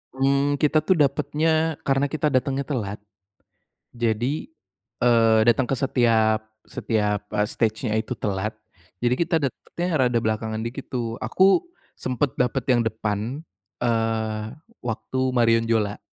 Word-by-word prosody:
Mmm, 140 +2 +2
kita 155 +1 +4
tuh 170 +5 +2
dapatnya 155 +2 +1
karena 135 +1 +2
kita 150 0 -1
datangnya 135 +2 0
telat, 105 -9 -3 1.0
jadi, 120 +7 -1 0.5
eee, 115 -2 +4
datang 120 +3 +4
ke - - +3
setiap 110 -4 +2 0.2
setiap, 105 -2 -1
eee, 105 0 +1
stage-nya 110 0 -1
itu 110 +3 -2
telat, 100 +1 -2 0.5
jadi 120 +1 +2
kita 170 +4 0
dapatnya 155 +5 -4
rada 125 -4 +2
belakangan 110 0 -2
dikit 115 +4 -6
tuh. 115 -3 -2
Aku, 190 - +4 0.3
sempat 130 +2 -1
dapat 125 -1 0
yang 120 -2 +3
depan, 110 +3 -2 0.4
eee, 115 -2 0 0.4
waktu 120 +2 -3 0.2
Marion 115 -1 +4
Jola 105 -3 0
120 Hz, 125 wpm, -24 LUFS, 110-140 Hz, 1.0 s, kita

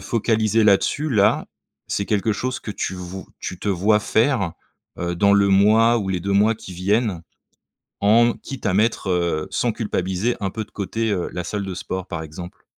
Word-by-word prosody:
focaliser 110 +1 +1
là-dessus 110 +9 +2
là, 100 -4 +3 0.4
c'est 100 - -2
quelque 105 +1 +1
chose 130 +4 -3
que 105 - -6
tu 95 - -3
vou 90 +1 -8
tu 90 - -5
te 105 - -4
vois 100 +3 +3
faire, 110 - +1 0.5
heu, 85 0 -2
dans 100 +2 +4
le 100 0 +4
mois 110 +4 +5
ou 100 -2 -3
les 90 -2 -1
2 100 +2 -2
mois 105 +3 +4
qui 95 -3 -11
viennent? 100 -1 0 0.8
En 115 +4 +5
quitte 135 -4 -9
à 100 - +2
mettre, 105 -1 +1
heu, 85 -3 0
sans 120 - 0
culpabiliser, 105 0 -1
un 95 - 0
peu 110 +2 -4
de - - -30
côté, 110 +2 -2
heu, 90 -3 -1
la 90 - -3
salle 105 +2 -3
de 95 - -4
sport 95 +1 -5
par 85 -2 -5
exemple? 85 +3 -10
100 Hz, 195 wpm, -22 LUFS, 95-110 Hz, 0.8 s, mois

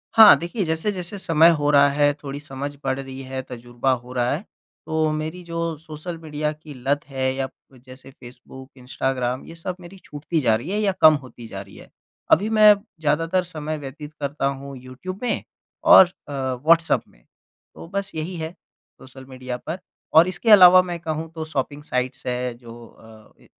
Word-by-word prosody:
हाँ, 220 -2 +10
देखिए 175 +5 -3
जैसे-जैसे 180 +4 -2
समय 165 -2 +4
हो 145 0 0
रहा 140 0 +6
है, 145 0 +2
थोड़ी 140 0 -6
समझ 145 0 -6
बढ़ 135 0 -1
रही 135 0 -8
है, 130 0 -5
तजुर्बा 120 +1 -2
हो 125 0 -4
रहा 125 -1 0
है। 170 +9 -3 0.4
तो 160 0 0
मेरी 155 +4 -4
जो 165 -1 -3
सोशल 160 +2 -8
मीडिया 150 -1 -3
की 155 -1 -12
लत 135 +3 -1
है 130 -1 -1
या 135 0 -2 0.3
जैसे 130 +1 -15
फेसबुक, 130 +1 -13
इंस्टाग्राम 125 0 -2
ये 165 - -11
सब 175 +2 -5
मेरी 175 +3 -12
छूटती 150 +3 -3
जा 115 -3 +3
रही 120 +10 -5
है 210 +2 -1
या 200 -2 +2
कम 155 0 +9
होती 120 -2 -12
जा 95 - -7
रही 100 0 -14
है। - - -14 0.4
अभी 210 +3 +4
मैं 215 -1 +7 0.3
ज़्यादातर 165 +4 +1
समय 155 -3 -5
व्यतीत 150 +2 -9
करता 140 0 -3
हूँ 140 0 -4
यूट्यूब 130 - -9
में 245 - -1 0.4
और 315 -11 +9
अ, 175 -4 -15
व्हाट्सएप 140 +5 +2
में। - - -26 0.5
तो - - -10
बस 200 +2 -3
यही 160 +3 -4
है 160 +1 -5
सोशल 130 -5 -18
मीडिया 130 -1 -6
पर 170 +4 -4 0.4
और 165 +2 +8
इसके 185 +5 -2
अलावा 185 -2 +9
मैं 175 -2 -5
कहूँ 160 -1 -4
तो 160 -1 -4
शॉपिंग 145 -1 -4
साइट्स 130 -2 -3
है 125 0 -2
जो 120 -1 -12
अ, 110 -1 -19
145 Hz, 185 wpm, -22 LUFS, 130-165 Hz, 0.5 s, हाँ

